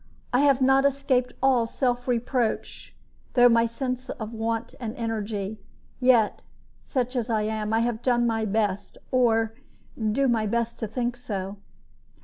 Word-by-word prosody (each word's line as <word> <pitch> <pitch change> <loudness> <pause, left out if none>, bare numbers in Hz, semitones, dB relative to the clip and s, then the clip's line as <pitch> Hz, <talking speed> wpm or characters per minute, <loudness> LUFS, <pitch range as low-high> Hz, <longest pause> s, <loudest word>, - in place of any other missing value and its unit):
I 250 - +4
have 275 -2 +4
not 270 +1 +5
escaped 275 -2 +1
all 255 -4 +4
self 245 0 -1
reproach 245 -1 -2 0.4
through 245 -1 +7
my 230 0 +4
sense 255 +2 -4
of 220 -2 -6
want 225 +1 -2
of 230 -1 -5
energy; 215 -2 -3 0.4
yet, 250 -4 +3 0.4
such 255 -2 -2
as 240 -1 -1
I 220 -2 +1
am, 215 0 -2
I 225 +1 +2
have 235 -1 -1
done 240 -2 +2
my 225 -1 0
best, 205 -2 -1
or 225 -3 +2 0.4
I - - -11
do 270 +6 +2
my 225 -3 +1
best 235 +2 -1
to 225 - -2
think 240 +2 -2
so." 200 -5 -5
235 Hz, 155 wpm, -26 LUFS, 220-250 Hz, 0.4 s, through